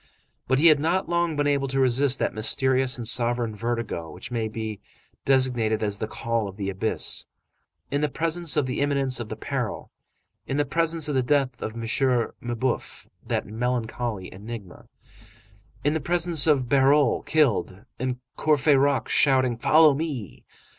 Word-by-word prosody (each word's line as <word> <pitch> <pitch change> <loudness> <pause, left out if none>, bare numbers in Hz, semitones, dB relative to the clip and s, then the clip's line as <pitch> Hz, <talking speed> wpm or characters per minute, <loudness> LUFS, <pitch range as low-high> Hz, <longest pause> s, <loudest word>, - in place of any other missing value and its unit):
But 130 - +2
he 150 - +2
had 155 -3 +7
not 170 +5 0
long 170 -2 0
been 145 0 0
able 140 -1 +1
to 135 0 -1
resist 130 +1 +2
that - - -1
mysterious 130 +4 +1
and 120 -2 -3
sovereign 120 -2 +1
vertigo 115 -7 -3
which - - -10
may 115 -2 -1
be 110 -1 -5 0.5
designated 125 -5 +2
as 105 -1 -1
the 110 - -3
call 115 0 -2
of 95 0 -10
the 100 -2 -3
abyss. 100 +4 -2 0.6
In 145 +1 0
the 150 - +1
presence 165 +2 +1
of 145 - +2
the 130 - -3
imminence 140 -3 0
of 115 -2 -6
the - - -4
peril, - - -4 0.6
in 135 - -2
the 145 - +1
presence 165 +1 +1
of 150 - -2
the 130 - +2
death 135 -1 0
of 110 - -4
M. 115 - -7 0.6
Mabeuf, 120 +1 -3 0.2
that - - -1
melancholy 115 -3 -3
enigma, 105 -1 -9 1.0
in 145 - +2
the 160 - 0
presence 170 -1 +3
of 135 -5 +3
Bahorel 140 0 +3
killed, 120 -9 +1
and 130 0 -2 0.2
Courfeyrac 145 -2 +2
shouting: 130 -3 +3
"Follow 155 +5 +5
me!" 140 - -5
130 Hz, 160 wpm, -25 LUFS, 115-145 Hz, 1.0 s, had